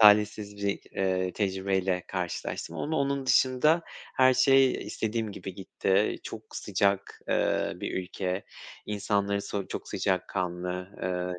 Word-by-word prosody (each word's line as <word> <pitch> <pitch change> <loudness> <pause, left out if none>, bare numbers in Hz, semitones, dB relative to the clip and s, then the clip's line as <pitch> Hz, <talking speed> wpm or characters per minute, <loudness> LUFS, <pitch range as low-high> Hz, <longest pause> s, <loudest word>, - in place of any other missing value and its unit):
talihsiz 105 -1 +5
bir, 100 0 -1
eee, 95 -1 0
tecrübeyle 95 -2 0
karşılaştım 90 -2 -3
onu 160 +1 -1
onun 140 -1 0
dışında 130 +6 +4 0.3
her 130 -1 +6
şey 135 0 +6
istediğim 110 -1 -2
gibi 95 -1 -7
gitti. 95 +1 +1
Çok - - -8
sıcak, 100 -1 0
eee, - - +2
bir - - -4
ülke, 90 +1 -3 0.4
insanları 100 -1 0
so 100 -1 -3
çok - - -5
sıcakkanlı, 90 -1 -1
eee, 90 -1 -2
100 Hz, 120 wpm, -29 LUFS, 95-110 Hz, 0.4 s, her